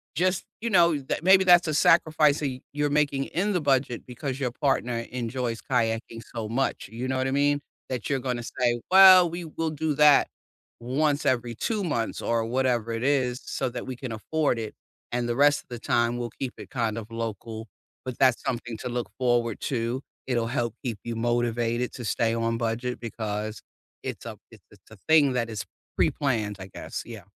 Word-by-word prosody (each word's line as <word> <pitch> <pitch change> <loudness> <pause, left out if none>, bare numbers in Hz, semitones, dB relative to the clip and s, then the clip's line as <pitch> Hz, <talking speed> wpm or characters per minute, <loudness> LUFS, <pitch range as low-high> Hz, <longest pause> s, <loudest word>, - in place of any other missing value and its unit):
just, 185 +1 +1 0.2
you 235 - -1
know, 170 -5 +5
tha 135 - -3
maybe 190 +1 +6
that's 175 -1 +6
a - - 0
sacrifice 155 -1 +4
that 145 - 0
you 130 -1 -7
you're 145 0 0
making 145 -2 +1
in 200 +4 -1
the 180 - +1
budget 135 -4 +1
because 130 +2 -4
your 130 -3 -1
partner 125 -3 0
enjoys 120 -1 -3
kayaking 115 -2 -1
so 110 -2 -3
much, 130 -3 -1
you 120 +3 -4
know 130 - -1
what 130 0 0
I - - -1
mean? 145 +1 +2 0.3
That 125 -5 -3
you're 140 -2 +1
gonna 125 -2 -3
say, 120 0 0
"Well, 185 -2 +9
we 170 +1 -6
will 160 0 -3
do 155 0 -1
that 150 -1 +6 0.5
once 145 +4 0
every 120 -2 0
2 215 - -1
months 120 -9 -2
or 115 -1 0
whatever 120 -1 0
it 115 +1 -3
is 130 -3 +1
so 130 - -2
that 125 - -6
we 130 - -4
can 125 0 -6
afford 140 +3 0
it 110 -1 -6 0.4
and 120 0 -1
the 120 - 0
rest 145 +2 +4
of - - -46
the 120 -1 -6
time 120 +1 +1
we'll 120 -1 -4
keep 130 -2 -3
it - - -10
kind 115 -4 -1
of 115 0 -7
local," 115 0 -5 0.4
but 130 -2 -5
that's 130 -3 +4
something 120 -2 -3
to 125 - -4
look 120 0 -3
forward 120 -3 +1
to. 120 -1 -2 0.3
It'll 120 -3 0
help 120 -3 -2
keep 120 -5 -3
you 120 -1 -4
motivated 120 +1 0
to 120 - -7
stay 115 +1 +1
on 115 0 0
budget 120 +2 -2
because 110 -2 -4 0.4
it's - - -6
a - - -7
it's - - -16
it's - - -21
a 110 - -12
thing 150 -4 +6
that 120 -2 -1
is 105 -3 -5 0.3
pre-planned 110 -7 +1
I 95 - -7
guess. - - -6
Yeah. 110 -4 -9
125 Hz, 200 wpm, -26 LUFS, 115-145 Hz, 0.5 s, Well